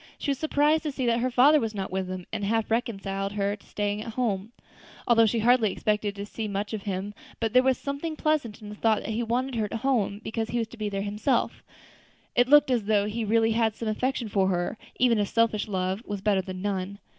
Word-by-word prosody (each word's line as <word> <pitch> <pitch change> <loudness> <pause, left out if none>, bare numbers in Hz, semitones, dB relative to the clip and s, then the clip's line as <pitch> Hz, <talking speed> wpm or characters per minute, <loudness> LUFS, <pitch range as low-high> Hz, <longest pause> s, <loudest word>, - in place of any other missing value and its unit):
She 285 - -1
was 275 - -2
surprised 305 0 +2
to 305 - -3
see 265 -2 -3
that 235 0 +2
her 255 +2 +1
father 275 +5 +6
was 225 -3 -3
not 195 -2 -4
with 190 0 -2
them, 185 -1 -5
and - - -2
it - - 0
half 225 +1 0
reconciled 195 -4 -2
her 200 0 0
to 205 - -22
staying 205 0 -2
at 225 0 -6
home, 220 -4 -1 0.6
although 230 -1 +5
she 230 - 0
hardly 230 -2 +4
expected 210 +1 -1
to 200 0 -5
see 215 +1 -5
much 205 +1 -3
of 215 - -3
him; 195 0 -4 0.3
but 225 -1 -1
there 250 - +7
was 260 0 +2
something 285 +3 -4
pleasant 285 -10 -1
in 210 - -8
the 210 - -7
thought 220 0 +2
that - - -4
he 220 +2 -1
wanted 250 +3 -1
her 220 -3 0
at 210 - -7
home 230 -7 +1
because 225 0 -3
he 240 - -1
was 225 -1 -1
to 240 - -12
be 215 -1 -2
there 195 -1 -3
himself; 210 +6 0 0.7
it 245 +1 +4
looked 295 -2 +6
as 235 -5 +1
though 205 -1 +2
he 220 +2 -3
really 225 +1 +3
had 220 -1 +1
some 230 - -5
affection 250 +2 -1
for 195 -2 +1
her, 175 -2 0
and - - -10 0.2
even 240 -3 +3
a 205 - +2
selfish 225 -1 +1
love 190 0 -1
was 205 -3 -4
better 195 -1 +2
than 185 0 -7
none. 200 -1 -2
220 Hz, 250 wpm, -27 LUFS, 200-240 Hz, 0.7 s, there